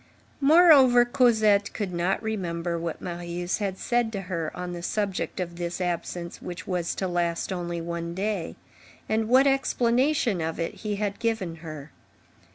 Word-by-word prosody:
Moreover, 280 Hz, -5 st, +7 dB
Cosette 220 Hz, -5 st, +3 dB
could 200 Hz, -4 st, -3 dB
not 175 Hz, +5 st, 0 dB
remember 175 Hz, -5 st, -2 dB
what 165 Hz, -1 st, -4 dB
Marius 175 Hz, +1 st, -3 dB
had 195 Hz, -2 st, -2 dB
said 240 Hz, 0 st, 0 dB
to 200 Hz, -, -3 dB
her 170 Hz, -4 st, -3 dB
on 180 Hz, 0 st, -4 dB
the 175 Hz, -, -6 dB
subject 200 Hz, +1 st, -2 dB
of 170 Hz, -1 st, -4 dB
this 175 Hz, 0 st, -4 dB
absence 175 Hz, -1 st, -3 dB
which 180 Hz, +1 st, -7 dB
was 180 Hz, -2 st, -2 dB
to 190 Hz, -, -2 dB
last 175 Hz, +1 st, -1 dB
only 175 Hz, -1 st, -3 dB
one 170 Hz, 0 st, -4 dB
day, 195 Hz, -3 st, -2 dB, 0.5 s
and 220 Hz, 0 st, 0 dB
what 260 Hz, +3 st, +6 dB
explanation 255 Hz, -, +2 dB
of 160 Hz, +1 st, -3 dB
it 165 Hz, -, -2 dB
he 210 Hz, -2 st, -2 dB
had 200 Hz, -1 st, -3 dB
given 220 Hz, -8 st, -1 dB
her. 155 Hz, -3 st, -9 dB
185 Hz, 160 wpm, -26 LUFS, 170-220 Hz, 0.5 s, Moreover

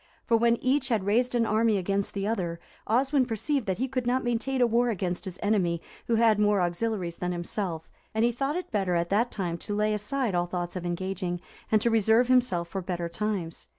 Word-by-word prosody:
For 235 Hz, -, +3 dB
when 235 Hz, +1 st, +3 dB
each 265 Hz, +1 st, +2 dB
had 220 Hz, -5 st, +1 dB
raised 240 Hz, +5 st, +2 dB
an 235 Hz, -1 st, +3 dB
army 220 Hz, 0 st, +2 dB
against 195 Hz, +2 st, -1 dB
the 200 Hz, 0 st, -1 dB
other, 180 Hz, -6 st, -2 dB, 0.3 s
Oswin 260 Hz, +3 st, +2 dB
perceived 250 Hz, +3 st, -1 dB
that 190 Hz, -, 0 dB
he 260 Hz, -, -1 dB
could 255 Hz, -2 st, -2 dB
not 255 Hz, +2 st, +1 dB
maintain 240 Hz, +3 st, -1 dB
a 245 Hz, -, +5 dB
war 240 Hz, +1 st, +2 dB
against 180 Hz, -4 st, -2 dB
his 185 Hz, -1 st, -6 dB
enemy 185 Hz, -5 st, +1 dB, 0.3 s
who 230 Hz, -, +2 dB
had 225 Hz, -2 st, +4 dB
more 205 Hz, -1 st, +3 dB
auxiliaries 175 Hz, 0 st, -1 dB
than 180 Hz, 0 st, -2 dB
himself, 175 Hz, -1 st, -3 dB, 0.3 s
and 220 Hz, +1 st, +3 dB
he 240 Hz, -, +3 dB
thought 275 Hz, +5 st, -2 dB
it 360 Hz, -, -4 dB
better 195 Hz, -4 st, 0 dB
at 170 Hz, 0 st, 0 dB
that 225 Hz, +5 st, +2 dB
time 175 Hz, -6 st, -3 dB
to 205 Hz, -, -4 dB
lay 210 Hz, +1 st, +1 dB
aside 220 Hz, +2 st, -1 dB
all 175 Hz, 0 st, +1 dB
thoughts 175 Hz, 0 st, -4 dB
of 175 Hz, -1 st, -3 dB
engaging, 180 Hz, 0 st, -3 dB, 0.3 s
and 215 Hz, -1 st, +4 dB
to 235 Hz, -, +2 dB
reserve 225 Hz, +3 st, +4 dB
himself 240 Hz, -10 st, +2 dB
for 190 Hz, +2 st, -3 dB
better 175 Hz, -1 st, -3 dB
times. 190 Hz, -4 st, -3 dB
210 Hz, 220 wpm, -27 LUFS, 180-235 Hz, 0.3 s, a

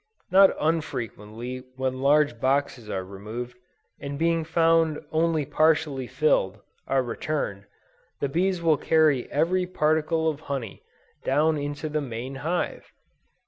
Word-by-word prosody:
Not 195 Hz, +1 st, +7 dB
unfrequently 125 Hz, -6 st, -3 dB
when 130 Hz, 0 st, -2 dB
large 145 Hz, -3 st, +3 dB
boxes 130 Hz, -3 st, 0 dB
are 95 Hz, -2 st, -2 dB
removed, 110 Hz, +6 st, -7 dB, 0.4 s
and 140 Hz, 0 st, -5 dB
being 165 Hz, +1 st, +1 dB
found 165 Hz, -1 st, +2 dB
only 160 Hz, -2 st, +1 dB
partially 150 Hz, -3 st, +1 dB
filled, 110 Hz, -11 st, +1 dB, 0.3 s
are 135 Hz, -1 st, +2 dB
returned, 115 Hz, -5 st, -3 dB, 0.5 s
the 140 Hz, -, 0 dB
bees 175 Hz, +4 st, 0 dB
will 160 Hz, -3 st, +4 dB
carry 155 Hz, -6 st, +2 dB
every 180 Hz, +5 st, +1 dB
particle 160 Hz, -1 st, +1 dB
of 155 Hz, -3 st, -1 dB
honey 135 Hz, -8 st, -5 dB, 0.4 s
down 155 Hz, +4 st, +2 dB
into 145 Hz, +2 st, -4 dB
the 150 Hz, 0 st, -1 dB
main 125 Hz, 0 st, -5 dB
hive! 175 Hz, +3 st, -2 dB
145 Hz, 125 wpm, -26 LUFS, 130-160 Hz, 0.5 s, Not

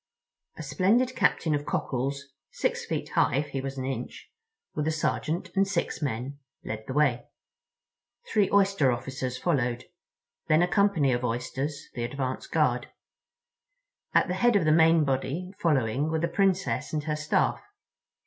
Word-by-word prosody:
A 160 Hz, -, -6 dB
splendid 215 Hz, -, +2 dB
captain 175 Hz, -6 st, +2 dB
of 145 Hz, 0 st, -2 dB
Cockles, 135 Hz, +2 st, -2 dB, 0.3 s
six -, -, -2 dB
feet -, -, -3 dB
high -, -, +2 dB
if 145 Hz, +2 st, -1 dB
he 135 Hz, -1 st, -3 dB
was 135 Hz, 0 st, -5 dB
an 130 Hz, -, -3 dB
inch, 130 Hz, -2 st, -6 dB, 0.4 s
with 150 Hz, 0 st, -2 dB
a -, -, +2 dB
sergeant 160 Hz, +1 st, -2 dB
and 195 Hz, 0 st, +3 dB
six 185 Hz, -4 st, -2 dB
men, 135 Hz, +1 st, -3 dB, 0.2 s
led 110 Hz, 0 st, -5 dB
the 130 Hz, -, -4 dB
way. 135 Hz, -5 st, +2 dB, 1.1 s
Three 205 Hz, -3 st, +3 dB
Oyster 195 Hz, -9 st, +4 dB
officers 130 Hz, +1 st, -4 dB
followed, 125 Hz, -8 st, 0 dB, 0.6 s
then 155 Hz, +2 st, +4 dB
a -, -, +2 dB
company 180 Hz, -9 st, +3 dB
of 120 Hz, +1 st, -1 dB
Oysters, 130 Hz, +5 st, -3 dB
the 120 Hz, -, -3 dB
advance 130 Hz, +1 st, -3 dB
guard. -, -, +1 dB, 1.3 s
At -, -, +5 dB
the 180 Hz, -, -1 dB
head 235 Hz, +5 st, +3 dB
of 190 Hz, -5 st, +3 dB
the 155 Hz, -, +4 dB
main 160 Hz, 0 st, +5 dB
body 145 Hz, +7 st, -2 dB
following 140 Hz, -, +1 dB
were 160 Hz, -, 0 dB
the 170 Hz, -, +1 dB
Princess 195 Hz, -2 st, 0 dB
and 150 Hz, -1 st, -1 dB
her 150 Hz, 0 st, -1 dB
Staff. 155 Hz, 0 st, 0 dB
150 Hz, 160 wpm, -27 LUFS, 130-175 Hz, 1.3 s, At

